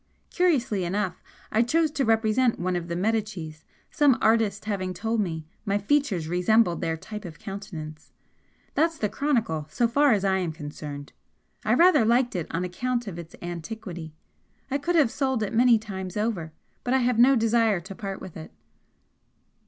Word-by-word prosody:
Curiously 265 Hz, -, +1 dB
enough 185 Hz, +1 st, -2 dB, 0.3 s
I 220 Hz, -, +3 dB
chose 310 Hz, +6 st, +2 dB
to 290 Hz, -3 st, 0 dB
represent 225 Hz, +2 st, +2 dB
one 180 Hz, +1 st, -1 dB
of 175 Hz, -1 st, -3 dB
the 170 Hz, -, -3 dB
Medicis, 190 Hz, -6 st, -2 dB, 0.3 s
some 285 Hz, -5 st, +4 dB
artist 220 Hz, -2 st, +2 dB
having 185 Hz, -3 st, -2 dB
told 225 Hz, +4 st, 0 dB
me 160 Hz, -5 st, -3 dB, 0.2 s
my 200 Hz, 0 st, +1 dB
features 205 Hz, -, +1 dB
resembled 180 Hz, +2 st, +2 dB
their 160 Hz, 0 st, -1 dB
type 210 Hz, +6 st, -8 dB
of 165 Hz, -5 st, -9 dB
countenance. 170 Hz, -7 st, -8 dB, 0.6 s
That's 325 Hz, +2 st, +1 dB
the 210 Hz, -, -1 dB
chronicle, 225 Hz, -, -1 dB
so 240 Hz, +6 st, +1 dB
far 280 Hz, +4 st, +4 dB
as 200 Hz, -2 st, 0 dB
I 190 Hz, 0 st, +2 dB
am 175 Hz, -4 st, -2 dB
concerned. 145 Hz, -2 st, -8 dB, 0.5 s
I -, -, +3 dB
rather 340 Hz, -7 st, +6 dB
liked 240 Hz, +1 st, +2 dB
it 170 Hz, -3 st, -2 dB
on 170 Hz, +2 st, -2 dB
account 240 Hz, +7 st, -2 dB
of 180 Hz, -5 st, -6 dB
its 170 Hz, -1 st, -10 dB
antiquity. 175 Hz, -2 st, -6 dB, 0.6 s
I 280 Hz, -, +1 dB
could 345 Hz, +5 st, -1 dB
have 290 Hz, -8 st, +4 dB
sold 265 Hz, -5 st, 0 dB
it 210 Hz, -, -3 dB
many 240 Hz, 0 st, +5 dB
times 190 Hz, -3 st, -6 dB
over, 210 Hz, -7 st, -2 dB, 0.3 s
but 250 Hz, +1 st, +1 dB
I 260 Hz, -2 st, +2 dB
have 245 Hz, -2 st, +1 dB
no 265 Hz, +3 st, +7 dB
desire 225 Hz, -3 st, +3 dB
to 190 Hz, +3 st, -9 dB
part 195 Hz, -2 st, -5 dB
with 185 Hz, -, -10 dB
it." 160 Hz, -, -9 dB
210 Hz, 175 wpm, -26 LUFS, 175-240 Hz, 0.6 s, no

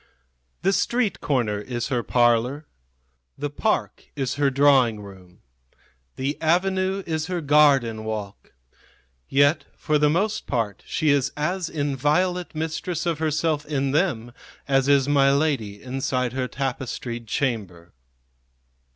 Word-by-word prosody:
The 195 Hz, -, +3 dB
street 230 Hz, +3 st, 0 dB
corner 120 Hz, -8 st, 0 dB
is 120 Hz, +3 st, -4 dB
her 125 Hz, -3 st, 0 dB
parlor, 120 Hz, +5 st, +2 dB, 0.7 s
the 145 Hz, 0 st, -4 dB
park 215 Hz, +9 st, -1 dB
is 135 Hz, -3 st, -2 dB
her 145 Hz, 0 st, +2 dB
drawing 135 Hz, -5 st, +4 dB
room; 95 Hz, -3 st, -14 dB, 0.7 s
the 140 Hz, +3 st, -3 dB
avenue 190 Hz, +3 st, +1 dB
is 160 Hz, -1 st, -2 dB
her 180 Hz, -1 st, -2 dB
garden 140 Hz, -7 st, +3 dB
walk; 105 Hz, -2 st, -6 dB, 0.8 s
yet 145 Hz, +2 st, +3 dB
for 150 Hz, -1 st, +1 dB
the 150 Hz, 0 st, +4 dB
most 205 Hz, +7 st, -1 dB
part 115 Hz, -6 st, -2 dB
she 155 Hz, -2 st, +1 dB
is 140 Hz, -2 st, +1 dB
as 175 Hz, +4 st, -1 dB
inviolate 155 Hz, +5 st, 0 dB
mistress 160 Hz, +3 st, -3 dB
of 165 Hz, -3 st, -1 dB
herself 155 Hz, -1 st, 0 dB
in 140 Hz, -3 st, -1 dB
them 140 Hz, -8 st, 0 dB, 0.4 s
as 135 Hz, -1 st, +2 dB
is 140 Hz, -1 st, +4 dB
my 140 Hz, -1 st, +4 dB
lady 140 Hz, -9 st, -1 dB
inside 130 Hz, -1 st, -2 dB
her 130 Hz, -1 st, -2 dB
tapestried 125 Hz, -3 st, -4 dB
chamber. 100 Hz, -10 st, -3 dB
140 Hz, 125 wpm, -24 LUFS, 120-155 Hz, 0.8 s, drawing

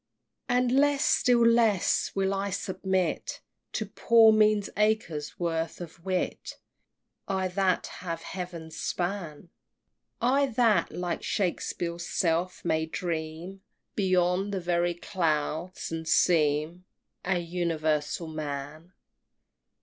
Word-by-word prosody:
XXX. 245 Hz, -, +2 dB
And 250 Hz, -1 st, +2 dB
less, 285 Hz, +2 st, +3 dB
still 240 Hz, -2 st, +4 dB
less, 230 Hz, -5 st, +3 dB
will 195 Hz, 0 st, +1 dB
I 195 Hz, +1 st, -1 dB
submit 190 Hz, -2 st, -2 dB, 0.3 s
To -, -, -1 dB
poor 225 Hz, -1 st, +5 dB
mean 215 Hz, -1 st, +4 dB
acres' 210 Hz, -8 st, 0 dB
worth 165 Hz, -1 st, -2 dB
of 170 Hz, -1 st, -10 dB
wit 185 Hz, -1 st, -3 dB, 0.7 s
I 190 Hz, -1 st, 0 dB
that 185 Hz, 0 st, +1 dB, 0.2 s
have 165 Hz, -2 st, -4 dB
heaven's 175 Hz, -4 st, -7 dB
span 175 Hz, -3 st, -3 dB, 0.7 s
I 270 Hz, +4 st, +3 dB
that 230 Hz, -3 st, +2 dB
like 175 Hz, -1 st, -3 dB
Shakspeare's 175 Hz, -2 st, -2 dB
self 175 Hz, +1 st, 0 dB
may 160 Hz, -1 st, +1 dB
dream 165 Hz, +3 st, -4 dB, 0.3 s
Beyond 185 Hz, 0 st, +2 dB
the 195 Hz, -, -1 dB
very 175 Hz, 0 st, 0 dB
clouds, 165 Hz, -1 st, -2 dB
and 160 Hz, 0 st, -4 dB
seem 160 Hz, +1 st, +2 dB, 0.4 s
An 180 Hz, -2 st, 0 dB
Universal 165 Hz, -2 st, -1 dB
Man! 155 Hz, +2 st, -6 dB
180 Hz, 110 wpm, -28 LUFS, 165-200 Hz, 0.7 s, poor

